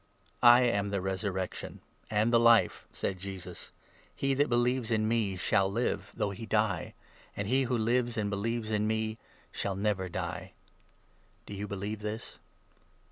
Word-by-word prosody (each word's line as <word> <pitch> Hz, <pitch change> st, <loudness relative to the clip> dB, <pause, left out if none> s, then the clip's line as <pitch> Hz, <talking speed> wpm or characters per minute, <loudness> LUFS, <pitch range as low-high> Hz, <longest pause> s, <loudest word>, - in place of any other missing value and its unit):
"I 120 Hz, +1 st, +8 dB
am 100 Hz, -4 st, +1 dB
the 100 Hz, -1 st, -1 dB
Resurrection 95 Hz, 0 st, -3 dB, 0.3 s
and 110 Hz, +3 st, +2 dB
the 115 Hz, -, +7 dB
Life," 115 Hz, 0 st, +4 dB
said 95 Hz, -2 st, -3 dB
Jesus. 95 Hz, -2 st, -8 dB, 0.5 s
"He 135 Hz, -, -1 dB
25 135 Hz, -, +2 dB
that 145 Hz, -, +3 dB
believes 120 Hz, 0 st, +1 dB
in 110 Hz, -2 st, +1 dB
me 110 Hz, -4 st, +1 dB
shall 95 Hz, +1 st, +2 dB
live, 120 Hz, +4 st, -1 dB
though 105 Hz, -3 st, -1 dB
he 110 Hz, +3 st, -7 dB
die; 105 Hz, -5 st, 0 dB, 0.4 s
and 100 Hz, -, -2 dB
he 130 Hz, +3 st, +2 dB
who 125 Hz, 0 st, 0 dB
26 110 Hz, -, 0 dB
lives 120 Hz, 0 st, +1 dB
and 105 Hz, -1 st, 0 dB
believes 110 Hz, +2 st, -2 dB
in 105 Hz, 0 st, +1 dB
me 110 Hz, 0 st, -1 dB, 0.3 s
shall 100 Hz, -1 st, -2 dB
never 100 Hz, -2 st, -1 dB
die. -, -, -5 dB, 0.9 s
Do -, -, -8 dB
you 100 Hz, +1 st, -4 dB
believe 100 Hz, +2 st, -4 dB
this? 105 Hz, +2 st, -6 dB
110 Hz, 165 wpm, -30 LUFS, 100-115 Hz, 0.9 s, I